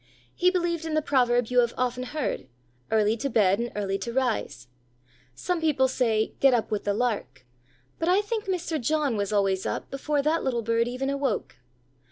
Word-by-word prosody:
He 360 - +3
believed 345 -3 -1
in 315 -1 -2
the 310 - +3
proverb 245 -4 +2
you 250 0 +3
have 235 -1 +2
often 250 0 -1
heard: 290 - -3 0.4
"Early 215 0 +3
to 275 +5 -2
bed 200 -4 +3
and 235 0 -2
early 195 -1 -1
to 235 +5 -4
rise." 235 - -1 0.7
Some 355 - -2
people 290 -5 +3
say: 225 -4 0
"Get 270 -2 +5
up 230 -1 -1
with 210 - -2
the 205 - +1
lark," 205 - -2 0.5
but 330 - 0
I 375 +3 +4
think 425 +1 -3
Mr. 350 -5 -2
John 295 -1 +1
was 200 -1 -2
always 195 -2 +1
up - - -4
before 285 +1 -1
that 315 +3 +1
little 240 -3 -1
bird 230 +1 +1
even 260 +3 -2
awoke. 275 - -2
250 Hz, 190 wpm, -26 LUFS, 220-305 Hz, 0.7 s, Get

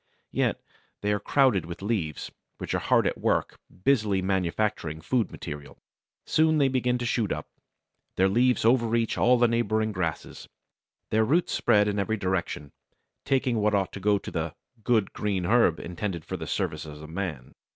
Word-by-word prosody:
Yet - - 0 0.4
they 105 0 +1
are 105 - 0
crowded 115 - +2
with 85 +2 -8
leaves, 95 -9 -2 0.3
which - - -4
are - - +1
hard - - +2
at - - -1
work - - 0 0.2
busily 105 -7 +3
manufacturing 95 -3 -1
food 115 +8 0
material. 75 -1 -8 0.5
Soon 155 0 +3
they 140 -2 +3
begin 125 -1 +1
to 120 - -4
shoot 115 -4 0
up. - - -3 0.7
Their 95 - +4
leaves 120 +4 +2
overreach 115 -1 +2
all 125 +1 +4
the 120 0 +4
neighbouring 110 -2 0
grasses. 85 -6 -4 0.6
Their 110 +1 +3
roots 160 +10 +1
spread 105 -3 +3
in 105 0 -1
every 110 +3 0
direction, 90 -6 -2 0.5
taking 130 -3 +1
what 105 0 +2
ought 95 -2 0
to - - -6
go 100 +1 +3
to - - -8
the 80 -1 -3 0.3
"good 110 -3 +1
green 100 -4 -1
herb 105 -5 +3
intended 85 -1 -4
for - - -4
the - - -6
service - - -2
of 75 0 -9
man." 80 -6 -5
105 Hz, 170 wpm, -27 LUFS, 90-120 Hz, 0.7 s, Their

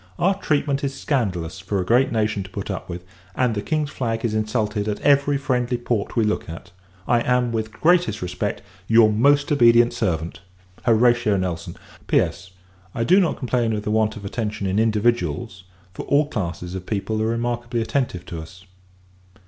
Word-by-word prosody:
Our 195 +3 +3
treatment 145 -4 0
is 135 -1 -3
scandalous, 95 - -2
for 100 - -2
a 90 - -1
great 125 +6 +3
nation 105 -3 0
to 95 - -8
put 100 +1 -5
up 95 - -6
with; 90 0 -7 0.3
and 125 -2 +1
the 105 - -2
King's 155 +2 -1
flag 115 -2 -2
is 110 - -1
insulted 110 -1 -1
at 105 - -2
every 140 0 +3
friendly 125 -2 -1
port 120 -3 -2
we 115 - +3
look 105 -5 -1
at. 85 +2 -9 0.4
I 120 - +3
am, 125 0 +1
with 110 -1 -1
the 105 - -18
greatest 175 +2 +3
respect, 90 -1 -3 0.2
your 115 -1 +6
most 140 +7 +3
obedient 120 -3 +5
servant, 85 -4 -2 0.5
HORATIO 120 -2 +4
NELSON. 90 -3 -4 0.3
P.S. 90 - 0 0.5
I 115 - 0
do 185 +9 +5
not 175 -5 +1
complain 120 -3 0
of 105 -1 -3
the 105 - -2
want 110 0 +1
of 105 -2 -9
attention 105 0 -3
in 95 +2 0
individuals, 110 -2 0 0.3
for - - -6
all 145 +2 +3
classes 90 - -4
of 95 -1 -6
people 110 +1 -2
are 110 - +1
remarkably 120 +1 -2
attentive 115 -6 -2
to 85 -2 -6
us. 90 +4 -13
115 Hz, 180 wpm, -22 LUFS, 100-125 Hz, 0.5 s, your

